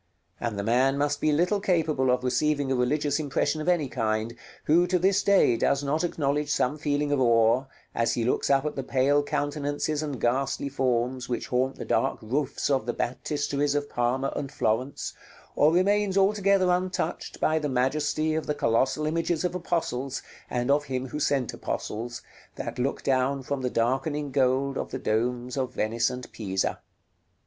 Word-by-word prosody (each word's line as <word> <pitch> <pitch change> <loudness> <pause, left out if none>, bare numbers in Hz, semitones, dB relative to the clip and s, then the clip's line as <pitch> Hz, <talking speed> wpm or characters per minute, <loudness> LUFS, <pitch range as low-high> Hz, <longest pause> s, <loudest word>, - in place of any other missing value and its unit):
And 115 -4 -3
the 100 - -2
man 130 +5 +2
must 145 0 0
be 155 - +3
little 180 +7 +2
capable 160 -9 +1
of 125 0 +2
receiving 140 +2 +1
a - - +2
religious 145 +4 +1
impression 145 +1 0
of 160 - -1
any 170 -5 +2
kind, 110 -1 -1 0.3
who, 170 +4 +4
to 180 +1 +2
this 190 +3 +3
day, 195 -12 +4
does 140 +4 +1
not 150 +4 0
acknowledge 150 -3 -1
some 145 +1 0
feeling 145 0 0
of 145 -2 +2
awe, 115 +1 +4 0.3
as 115 0 +1
he 120 - 0
looks 125 - 0
up 140 +1 +3
at 150 - -2
the 135 - -2
pale 135 +2 +2
countenances 145 +1 -2
and 145 -5 -4
ghastly 135 +3 0
forms 125 -1 -1
which 120 - -3
haunt 130 +2 0
the - - -7
dark - - +1
roofs 135 +5 -1
of 135 -2 +1
the 120 - 0
Baptisteries 145 +2 -1
of 145 0 -2
Parma 125 +3 0
and 140 -1 -4
Florence, 125 +6 -1 0.4
or 150 +2 +5
remains 200 +2 +2
altogether 195 -2 +3
untouched 180 -2 -2
by 155 0 +2
the 150 -1 -2
majesty 150 +4 0
of 160 0 -2
the 150 - 0
colossal 130 +6 +1
images 165 +1 0
of 180 - -1
apostles, 140 -7 -2 0.3
and 125 +2 0
of 145 +1 +2
Him 130 -1 -3
who 150 - -4
sent 140 -4 0
apostles, 120 +3 -4 0.3
that - - -5
look 135 +3 -1
down 135 0 +1
from 140 +1 -3
the 125 - 0
darkening 135 +5 -1
gold 135 +1 +1
of - - -4
the - - -4
domes 120 +1 -1
of 130 -1 -2
Venice 115 +2 +1
and 125 0 -6
Pisa. 95 -3 -2
140 Hz, 180 wpm, -27 LUFS, 125-150 Hz, 0.4 s, or